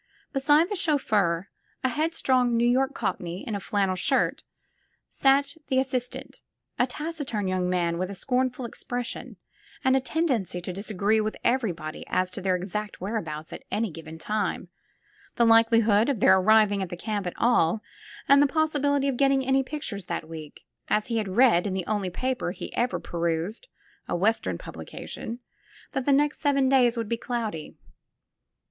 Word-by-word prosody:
Beside 295 +4 +4
the 410 - -3
chauffeur, 210 - +1 0.3
a 260 - +2
headstrong 260 -5 +1
New 235 - +3
York 265 +3 +2
cockney 175 +1 -3
in 225 - -3
a 200 - -1
flannel 195 -1 0
shirt, 265 +9 +1 0.7
sat 280 +1 +2
the 260 - +1
assistant, 255 -2 -3 0.4
a 250 - +3
taciturn 285 - -3
young 185 -1 0
man 170 -2 0
with 185 +1 -2
a 200 - -6
scornful 255 +3 -1
expression 245 +1 -5 0.5
and 260 0 +4
a - - +4
tendency 260 - -1
to 180 +1 -6
disagree 210 +2 0
with 215 0 -3
everybody 180 -11 -1
as 185 0 0
to 195 - -6
their 185 -1 +1
exact 205 +3 -4
whereabouts 165 -7 -4
at - - -7
any 215 -2 -1
given 160 0 -9
time, 210 +5 -2 0.7
the 235 - +4
likelihood 225 0 +5
of 265 -7 0
their 190 - +6
arriving 205 0 +4
at 190 - -3
the 175 - -6
camp 205 -1 -3
at 175 - -5
all 220 -4 +2 0.4
and 280 0 +7
the 290 - +5
possibility 285 -2 +1
of 270 -3 -1
getting 270 -1 +3
any 265 +1 +3
pictures 260 - -5
that 155 - -4
week, 155 -2 -10 0.2
as 215 +2 0
he - - +1
had 215 -2 -1
read 230 -8 +5
in 190 - -2
the 185 -2 -2
only 205 -3 -1
paper 255 +2 -2
he 180 - -7
ever 245 +2 0
perused, 170 - -2 0.4
a - - -1
Western 210 +6 +1
publication, 235 +2 -7 0.5
that 265 0 -3
the - - +5
next 290 +2 +2
seven 275 -3 +2
days 250 -3 +4
would 230 -2 -2
be 235 - -1
cloudy. 225 -10 -4
225 Hz, 165 wpm, -26 LUFS, 185-265 Hz, 0.7 s, and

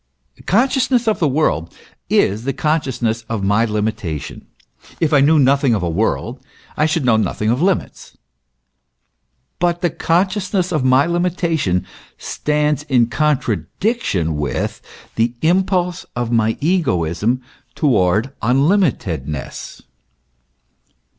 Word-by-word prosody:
Consciousness 250 +2 +2
of 220 - +1
the 160 - +2
world 110 - 0 0.4
is 105 +4 +2
the 135 +2 -1
consciousness 130 -6 -1
of 110 -3 -2
my 105 +4 +2
limi 105 0 0
tation; 85 -9 -7 0.5
if 160 -2 +1
I 140 - +5
knew 155 +3 +4
nothing 140 -3 +3
of 95 - -2
a 85 - 0
world, 80 -7 -1 0.3
I 155 - +2
should 155 -3 -1
know 115 -3 +4
nothing 110 0 0
of 125 +5 0
limits: 190 +1 -2 1.4
hut 175 -1 +1
the 175 - +1
consciousness 185 +3 0
of 155 -6 0
my 130 +2 +4
limitation 170 - 0 0.3
stands 150 -1 -1
in 120 -4 +3
contradiction 125 - -1
with 75 -1 -3 0.4
the 115 +2 +1
impulse 180 +1 +1
of 120 -1 -2
my 110 -1 +1
egoism 125 - 0 0.3
towards 110 - +2
unli 135 - +3
mitedness. 75 - -6
135 Hz, 120 wpm, -18 LUFS, 110-170 Hz, 1.4 s, I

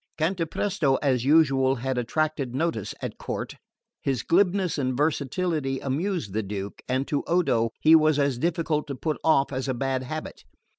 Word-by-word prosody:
Cantapresto 165 -2 0
as 130 -3 +1
usual 135 -3 +4
had 130 0 -2
attracted 140 0 -1
notice 135 - -2
at - - -5
court. - - -4 0.5
His 135 -5 -1
glibness 185 -1 +2
and 130 -2 -1
versatility 150 -1 0
amused 150 - -2
the 110 - 0
Duke, 100 -1 -6
and 130 +2 0
to 145 - 0
Odo 125 -10 +2
he 155 - +6
was 155 -2 +4
as 140 -4 +1
difficult 160 -2 0
to 140 - -4
put 155 +4 -2
off 140 -3 +3
as 130 +1 -2
a 130 - -1
bad 130 +1 -1
habit. 155 +5 -6
140 Hz, 160 wpm, -26 LUFS, 130-160 Hz, 0.5 s, he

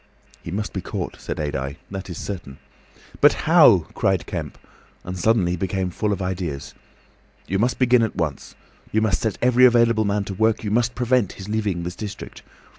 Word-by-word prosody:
"He - - -8
must 105 +4 -3
be 95 - -3
caught," - - -5
said - - -5
Adye. 70 -2 -3 0.2
"That 95 -1 -6
is 85 - -6
certain." 85 -9 -6 0.6
"But - - +6
how?" - - +6
cried - - 0
Kemp, - - -5 0.5
and 90 - -6
suddenly 90 -1 +2
became 95 0 -2
full 105 +4 -1
of 100 -1 -2
ideas. 90 -7 -4 0.7
"You 95 +2 -1
must 120 +3 +1
begin 125 -1 +4
at 110 - -1
once. 75 -6 -3 0.4
You 110 - +2
must 105 -4 +1
set 110 -4 -1
every 125 0 +4
available 115 -3 +5
man 100 0 0
to 100 - -6
work; 110 +3 +1
you 105 - -2
must 120 +2 +1
prevent 125 -4 +1
his 95 +1 -9
leaving 105 -5 -1
this 90 +1 -5
district. 105 0 -8
100 Hz, 185 wpm, -22 LUFS, 90-110 Hz, 0.7 s, But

